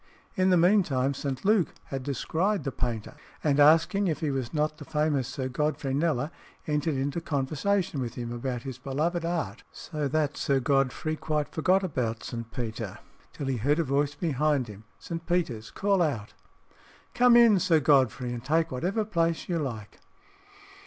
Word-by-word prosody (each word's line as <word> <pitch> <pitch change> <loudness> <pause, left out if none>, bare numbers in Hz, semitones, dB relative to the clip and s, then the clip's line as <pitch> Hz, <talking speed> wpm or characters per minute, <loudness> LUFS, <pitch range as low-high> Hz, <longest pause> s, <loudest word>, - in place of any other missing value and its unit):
In 185 0 +3
the 180 - +5
meantime 165 -8 +3
St. 135 +1 -4
Luke 205 -5 +3
had 135 -1 -5
descried 160 - -1
the 135 - -2
painter, 120 -4 -3 0.3
and 145 -2 +2
asking 165 +7 +5
if 155 -4 -1
he 155 -3 -1
was 130 -3 -3
not 155 0 -1
the - - -7
famous 150 -4 0
Sir 130 0 -3
Godfrey 145 +1 -1
Kneller, 150 -1 0 0.3
entered 150 0 0
into 140 +5 -2
conversation 155 +3 -1
with 120 -1 -4
him 120 -1 -5
about 120 0 -3
his 130 -2 -7
beloved 155 +6 -1
art, 170 -1 -2
so 150 -3 -4
that 150 0 0
Sir 140 -1 +1
Godfrey 135 +4 +1
quite 150 -1 -2
forgot 185 +4 +2
about 120 -10 -2
St. 115 -1 -6
Peter 115 -4 -5 0.3
till 145 - -6
he 135 -2 -1
heard 145 +7 +2
a 165 - +2
voice 140 +1 0
behind 145 -4 0
him 105 +1 -11
St. 165 -1 -6
Peter's 145 -12 -1
call 195 -2 +1
out, 135 -11 -1 0.8
"Come 245 0 +5
in, 230 -5 +7
Sir 165 -2 +3
Godfrey, 130 -3 +2
and 120 -1 -6
take 160 +4 +1
whatever 185 - -1
place 170 -5 0
you 170 -2 0
like." 115 -8 -5
145 Hz, 170 wpm, -28 LUFS, 130-165 Hz, 0.8 s, in